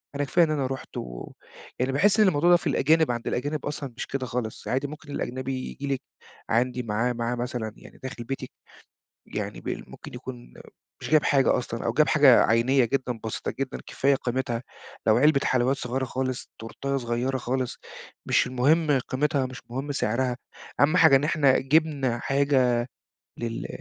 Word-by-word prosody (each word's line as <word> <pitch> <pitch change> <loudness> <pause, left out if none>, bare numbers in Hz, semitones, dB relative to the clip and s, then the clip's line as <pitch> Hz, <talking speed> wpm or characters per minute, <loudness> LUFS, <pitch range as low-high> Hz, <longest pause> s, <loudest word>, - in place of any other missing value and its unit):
أنا 145 - 0
كفاية 170 +5 +3
إن 155 - -3
أنا 140 -4 0
رُحت 135 0 -7
و - - -7 0.5
يعني 130 +2 +1
باحِس 195 +10 +3
إن 210 - +6
الموضوع 170 -1 +3
ده 175 - +7
في 175 - -5
الأجانب 155 +1 +3
عند 120 -1 -4
الأجانب 145 +3 -2
أصلًا 145 -3 -5
مش - - -4
كده 135 -2 -3
خالص. 120 -3 -4
عادي 135 +3 0
ممكن 150 0 -10
الأجنبي 130 -1 -3
ييجي 140 - -6
لِك 130 - -3 0.5
عندي 125 +2 +1
معاه 115 +3 0
معاه 120 0 -2
مثلًا 120 -3 -4
يعني - - -15
داخل 130 -2 -6
بيتي 135 +3 -5 0.8
يعني - - -5
بال - - -6
ممكن - - -11
يكون - - -9 0.5
مش - - -6
جايب 155 -1 +5
حاجة 135 -3 +3
أصلًا، 120 -2 -5
أو 115 - +1
جاب 155 +5 +3
حاجة 140 -5 +6
عينيّة 120 +4 +3
جدًا، 125 -1 -2
بسيطة 110 - -3
جدًا 135 -1 -3
كفاية 140 +1 +2
قيمتها. 125 -2 -2 0.4
لو 110 - +5
علبة 145 +2 +4
حلويّات 130 +2 +2
صغيرة 130 0 -2
خالص، 130 0 -3
تورتاية 135 +5 -4
صغيرة 125 +1 -1
خالص، 125 0 -2 0.5
مش - - +3
المهم 145 +4 +3
قيمتها، 135 0 +1
مش 130 -1 -9
مهم 135 +4 -3
سعرها، 125 0 0 0.4
أهَم 155 +5 +4
حاجة 160 -6 +7
إن 135 - +1
إحنا 145 -4 +3
جِبنا 140 -3 +1
حاجة 135 -2 +2 0.6
لل 115 -1 -4
130 Hz, 175 wpm, -26 LUFS, 120-145 Hz, 0.8 s, ده